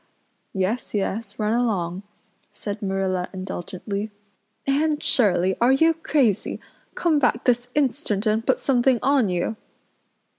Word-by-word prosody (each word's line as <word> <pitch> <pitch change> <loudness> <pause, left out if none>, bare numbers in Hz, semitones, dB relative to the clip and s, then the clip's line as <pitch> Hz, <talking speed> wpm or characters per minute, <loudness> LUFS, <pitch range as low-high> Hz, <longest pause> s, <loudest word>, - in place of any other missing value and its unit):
"Yes, 195 +5 -1
yes, 205 +1 -2
run 215 0 0
along," 195 -7 0 0.5
said 205 0 -5
Marilla 190 -2 -1
indulgently. 190 +2 -5 0.6
"Anne 295 +2 +1
Shirley 190 -9 +2
are 240 +2 +5
you 320 +5 +4
crazy? 275 - 0 0.4
Come 320 -4 +2
back 245 -3 +1
this 245 0 +1
instant 260 -7 +1
and 215 +1 +1
put - - +2
something 255 -1 +2
on 265 -5 +3
you. 180 +5 -1
220 Hz, 120 wpm, -23 LUFS, 195-265 Hz, 0.6 s, are